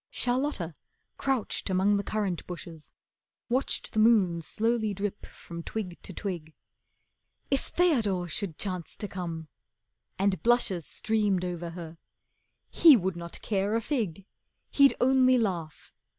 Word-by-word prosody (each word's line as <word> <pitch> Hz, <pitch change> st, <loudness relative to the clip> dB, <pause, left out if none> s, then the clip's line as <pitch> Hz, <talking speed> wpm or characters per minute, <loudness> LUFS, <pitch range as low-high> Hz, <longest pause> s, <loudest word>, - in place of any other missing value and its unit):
Charlotta, 245 Hz, -, -1 dB, 0.4 s
crouched 265 Hz, -7 st, -1 dB
among 190 Hz, +2 st, +3 dB
the 200 Hz, -, 0 dB
currant 200 Hz, -6 st, -2 dB
bushes, 170 Hz, -3 st, -8 dB, 0.6 s
Watched 255 Hz, +3 st, -1 dB
the 220 Hz, -, +1 dB
moon 205 Hz, -7 st, +4 dB
slowly 220 Hz, +3 st, 0 dB
dip 200 Hz, +1 st, -4 dB
from 170 Hz, 0 st, -9 dB
twig 185 Hz, -1 st, -5 dB
to -, -, -8 dB
twig. 170 Hz, -5 st, -5 dB, 1.0 s
If 275 Hz, -, +1 dB
Theodore 220 Hz, -, +2 dB
should 175 Hz, -1 st, -3 dB
chance 185 Hz, -4 st, -3 dB
to 205 Hz, -, -3 dB
come, 170 Hz, -4 st, -5 dB, 0.7 s
and 195 Hz, -3 st, +1 dB
blushes 225 Hz, -8 st, +2 dB
Streamed 205 Hz, -4 st, 0 dB
over 175 Hz, -1 st, -4 dB
her. 165 Hz, -1 st, -9 dB, 0.7 s
He 315 Hz, -6 st, +8 dB
would 190 Hz, -2 st, -1 dB
not 170 Hz, 0 st, -8 dB
care 200 Hz, 0 st, 0 dB
a 230 Hz, -, +1 dB
fig, 210 Hz, -, -2 dB, 0.5 s
He'd 280 Hz, -1 st, +5 dB
only 255 Hz, 0 st, +5 dB
laugh. 175 Hz, -9 st, -3 dB
195 Hz, 130 wpm, -28 LUFS, 175-230 Hz, 1.0 s, He